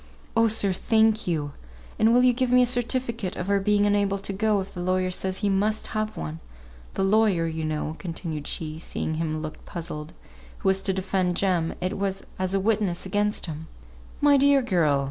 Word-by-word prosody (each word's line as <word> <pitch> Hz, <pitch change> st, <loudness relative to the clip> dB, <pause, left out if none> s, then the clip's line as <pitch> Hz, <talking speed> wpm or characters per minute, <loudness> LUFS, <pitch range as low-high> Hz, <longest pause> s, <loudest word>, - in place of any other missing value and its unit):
"Oh, 225 Hz, 0 st, +5 dB
sir, 210 Hz, -3 st, +3 dB
thank 220 Hz, +2 st, +2 dB
you! 150 Hz, -4 st, -1 dB, 0.5 s
And 220 Hz, +1 st, +5 dB
will 245 Hz, +1 st, +5 dB
you 250 Hz, -1 st, +5 dB
give 250 Hz, 0 st, 0 dB
me 250 Hz, 0 st, +6 dB
a -, -, +4 dB
certificate 235 Hz, -4 st, 0 dB
of 180 Hz, -, -4 dB
her 200 Hz, 0 st, +2 dB
being 205 Hz, +1 st, +2 dB
unable 205 Hz, -1 st, +2 dB
to 195 Hz, 0 st, -5 dB
go, 210 Hz, +1 st, +1 dB
if 190 Hz, 0 st, -6 dB
the 180 Hz, -, -6 dB
lawyer 185 Hz, 0 st, 0 dB
says 190 Hz, +2 st, -3 dB
we 205 Hz, -, +3 dB
must 210 Hz, +3 st, +1 dB
have 215 Hz, 0 st, -2 dB
one? 80 Hz, +1 st, -5 dB, 0.6 s
The -, -, 0 dB
lawyer, 195 Hz, -4 st, +3 dB
you 160 Hz, -1 st, -3 dB
know," 155 Hz, 0 st, -2 dB
continued 165 Hz, -4 st, -5 dB
she, 155 Hz, -1 st, -3 dB
seeing 160 Hz, -, -3 dB
him 155 Hz, -1 st, -2 dB
look 155 Hz, 0 st, -7 dB
puzzled, 160 Hz, -2 st, -6 dB, 0.4 s
"who -, -, 0 dB
is 190 Hz, 0 st, +2 dB
to 195 Hz, -, +1 dB
defend 185 Hz, -2 st, -1 dB
Jem, 180 Hz, -4 st, +1 dB
it 185 Hz, +2 st, -2 dB
was 195 Hz, -1 st, -2 dB, 0.2 s
as 185 Hz, +1 st, 0 dB
a -, -, +2 dB
witness 200 Hz, -4 st, 0 dB
against 205 Hz, +2 st, 0 dB
him 160 Hz, -1 st, -7 dB, 0.3 s
" -, -, -21 dB
"My 285 Hz, -1 st, +6 dB
dear 280 Hz, 0 st, +4 dB
girl!" 165 Hz, -10 st, +2 dB
195 Hz, 205 wpm, -25 LUFS, 170-215 Hz, 0.6 s, me